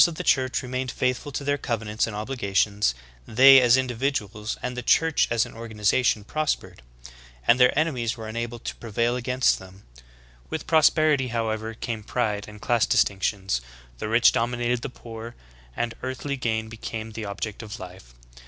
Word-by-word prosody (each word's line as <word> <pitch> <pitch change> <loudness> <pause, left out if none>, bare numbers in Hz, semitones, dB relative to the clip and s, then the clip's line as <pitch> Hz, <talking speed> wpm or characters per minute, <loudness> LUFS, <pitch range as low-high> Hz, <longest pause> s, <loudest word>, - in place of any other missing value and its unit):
While - - +9
the - - +1
members 160 - -8
of - - -4
the - - +7
Church 130 -1 -2
remained 130 +1 -3
faithful 125 +3 -1
to 140 - -4
their 145 0 +1
covenants 110 -3 -1
and 110 - -6
obliga 105 -2 -4
tions, 100 - +2 0.3
they 135 +3 +8
as 125 0 +5
individuals 120 -5 -2
and 125 0 -3
the 125 - -3
Church 160 +4 +3
as 115 -1 +2
an - - -11
organization 110 0 +1
prospered; 155 - -2 0.7
and 125 - +5
their 125 +2 +5
enemies 125 -8 0
were 110 -1 -7
unable 115 +1 -4
to 115 - -6
prevail 115 +2 -1
against 125 +1 +1
them. 95 +1 -14 0.7
With 160 - -4
prosperity, 155 -3 +4
however, 110 -1 -2
came 115 -1 -4
pride 105 -2 -2
and 105 0 -11
class 120 0 +2
dis - - +5
tinctions, 95 - -2 0.4
the 105 - -3
rich 115 +1 +5
dominated 120 0 0
the 140 - -4
poor, 115 -1 -9 0.4
and 120 -1 -1
earthly 130 +2 -3
gain 110 -3 -2
be 110 0 -10
came 110 0 -6
the 110 0 -6
object 100 +2 -5
of 110 +1 -8
life 90 -10 -11
115 Hz, 180 wpm, -25 LUFS, 110-130 Hz, 0.7 s, While